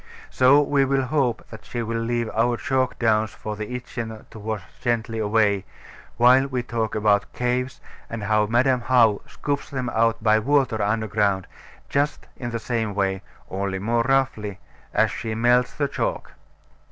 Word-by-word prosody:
So 135 +3 +5
we 140 -1 +2
will 135 0 +1
hope 130 -4 0
that 110 - -10
she 120 -1 -4
will 115 0 -2
leave 115 0 -1
our 120 +2 +2
chalk 130 -1 0
downs 110 -2 +2
for 105 0 -5
the 110 +4 -5
Itchen 115 -3 -6
to 110 - -10
wash 105 -2 -4 0.2
gently 115 -2 -1
away, 105 -2 +2 0.5
while 125 +3 +6
we 130 -3 -2
talk 115 -2 -2
about 105 -1 +2
caves, 125 +1 -1 0.3
and 115 -2 -5
how 105 0 +2
Madam 125 +3 +2
How 115 -5 +4
scoops 145 -1 -3
them 130 -3 -3
out 115 0 +1
by 110 0 +4
water 130 -2 +1
underground, 105 -2 0 0.4
just 145 +1 -1
in 120 - -5
the 115 - -2
same 110 -3 -2
way, 95 -1 0 0.3
only 95 0 -3
more 115 +5 +1
roughly, 120 -6 0 0.3
as - - +2
she 110 -1 -4
melts 120 +2 +3
the 145 - 0
chalk. - - -3
115 Hz, 165 wpm, -23 LUFS, 110-125 Hz, 0.5 s, while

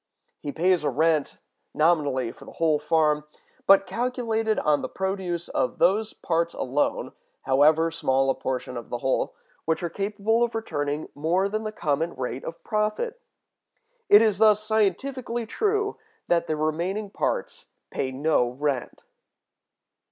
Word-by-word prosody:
He 145 - -5
pays 175 +2 +2
a - - +1
rent, 155 +2 +1 0.4
nominally 145 -7 +2
for - - -15
the - - -12
whole 160 -2 +2
farm, 150 -1 +2 0.4
but 195 0 +7
calculated 225 -1 -1
on 150 -1 +2
the - - -4
produce 190 -3 -3
of - - -1
those 215 +4 +2
parts 170 0 -1
alone 135 +4 -1 0.3
(however 155 +5 +4
small 135 -4 +1
a - - +1
portion 130 -1 -4
of 120 - -8
the 120 - -2
whole) 130 +2 -1 0.3
which 160 +2 0
are 170 - -2
capable 210 +3 0
of 240 -1 +1
returning 150 -8 -3
more 170 +6 +1
than 215 +2 -3
the 215 - -2
common 160 -3 -1
rate 125 0 -4
of 165 - -8
profit. 215 - -1 0.9
It 205 +2 +8
is 210 -3 +2
thus 215 -1 +5
scientifically 230 +3 0
true 415 - -1 0.3
that 170 -1 +2
the 155 - 0
remaining 175 +7 -2
parts - - -3 0.2
pay 130 - -2
no 135 -2 +1
rent. 135 0 -3
170 Hz, 145 wpm, -25 LUFS, 150-215 Hz, 0.9 s, It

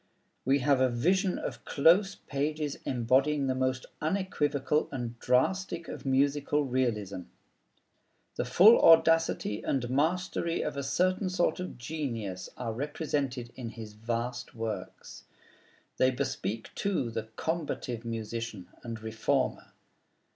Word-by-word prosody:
We 135 +1 +4
have 140 -3 +4
a 130 - +4
vision 180 +10 +1
of - - -5
close 180 +7 +4
pages 150 +1 -2
embodying 135 +4 +2
the 130 - +1
most 130 0 -1 0.2
unequivocal 150 -4 0
and 120 -3 -5
drastic 170 +7 +1
of - - -7
musical 140 +2 +2
"realism." 115 -7 -1 1.2
The - - -1
full 215 +6 +7
audacity 165 -9 +4
and 130 -3 -1
mastery 170 +3 0
of 150 - -3
a 140 - -2
certain 185 +7 +1
sort 180 -1 +1
of 180 -6 -5
genius 115 -10 -4
are 115 -3 -3
represented 135 -2 -3
in 120 -3 -5
his 110 -2 -9
vast 120 +3 -4
works. 110 -5 -6 0.7
They 130 - +4
bespeak, 115 -3 -3
too, 185 -12 -1
the 110 -1 -4
combative 150 -8 -3
musician 115 -4 -5
and 115 -2 -6
reformer. 110 0 -1
135 Hz, 120 wpm, -30 LUFS, 115-160 Hz, 1.2 s, full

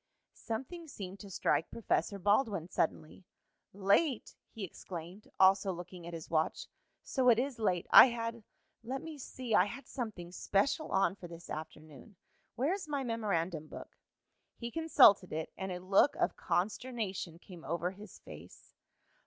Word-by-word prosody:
Something 270 +9 -6
seemed 195 -7 -8
to 200 - -10
strike 165 -3 0
Professor 210 -2 -1
Baldwin 200 -2 +1
suddenly. 165 0 -2 0.5
"Late!" 205 - +1 0.2
he 220 - -8
exclaimed, 180 +2 -8
also 190 +1 +5
looking 175 -1 -8
at 170 - -7
his 160 - -8
watch. 160 -1 0 0.4
"So 260 -2 +2
it 230 - +6
is 255 0 -2
late. 180 -5 +1
I - - +11
had 230 -1 -4 0.4
let 265 +5 -4
me 320 -2 -8
see 250 -2 -5
I 185 - +6
had 275 +5 -8
something 210 -10 -6
special 205 - 0
on 195 0 +3
for 180 - -10
this 170 0 -11
afternoon. 155 - -9 0.4
Where 275 +9 +1
is 385 -4 -5
my 285 -2 -2
memorandum 185 - -2
book?" - - -10 0.6
He 235 0 -5
consulted 225 - +5
it, 155 +1 -4
and 190 -1 -4
a 180 - -4
look 195 +9 +3
of - - 0
consternation 195 -4 -2
came 175 -1 -13
over 170 +5 -2
his 205 +3 -12
face. - - -13
200 Hz, 155 wpm, -33 LUFS, 175-235 Hz, 0.6 s, I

